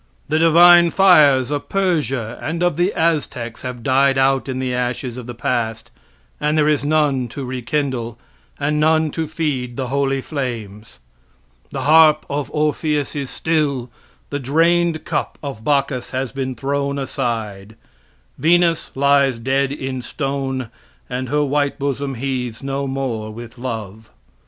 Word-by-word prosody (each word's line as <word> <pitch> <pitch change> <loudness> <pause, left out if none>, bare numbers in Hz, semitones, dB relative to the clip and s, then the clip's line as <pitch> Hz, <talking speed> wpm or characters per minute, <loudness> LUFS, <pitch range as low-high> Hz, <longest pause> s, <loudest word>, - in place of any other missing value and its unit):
The 155 +1 +2
divine 170 +1 +7
fires 150 -9 +5
of 145 -1 -3
Persia 145 - -1
and 165 +3 -2
of 175 - +2
the 175 +3 +1
Aztecs 140 -8 -1
have 125 -2 -6
died 135 +1 +3
out 135 0 +2
in 130 - -3
the 130 -1 -2
ashes 125 0 -2
of 125 -2 -8
the 120 - -7
past, 115 -1 -2 0.5
and 150 +1 0
there 150 -1 +3
is 150 -4 +2
none 145 -4 +1
to 135 +3 -6
rekindle, 125 -2 -2 0.4
and 150 +1 0
none 160 0 +3
to 160 +1 -3
feed 145 -7 -3
the 130 -2 -3
holy 135 0 0
flames. 115 -7 -6 0.7
The 135 - -4
harp 155 +1 +6
of 145 0 -2
Orpheus 150 -1 0
is 140 -3 -3
still; 140 -7 -1 0.4
the 145 - -2
drained 165 +4 +2
cup - - -2
of 135 -6 -6
Bacchus 140 -2 0
has 130 -1 -3
been 130 -1 -4
thrown 140 +3 -2
aside; 110 -6 -4 0.6
Venus 170 0 +3
lies 140 -2 +3
dead 135 +3 0
in 130 -2 -4
stone, 135 -2 -3 0.4
and 125 0 -3
her 150 +1 +2
white 145 0 0
bosom 140 -1 -2
heaves 125 -2 -4
no 140 0 -2
more 130 -5 -3
with 120 +2 -10
love. 110 -3 -6
135 Hz, 145 wpm, -20 LUFS, 125-150 Hz, 0.7 s, divine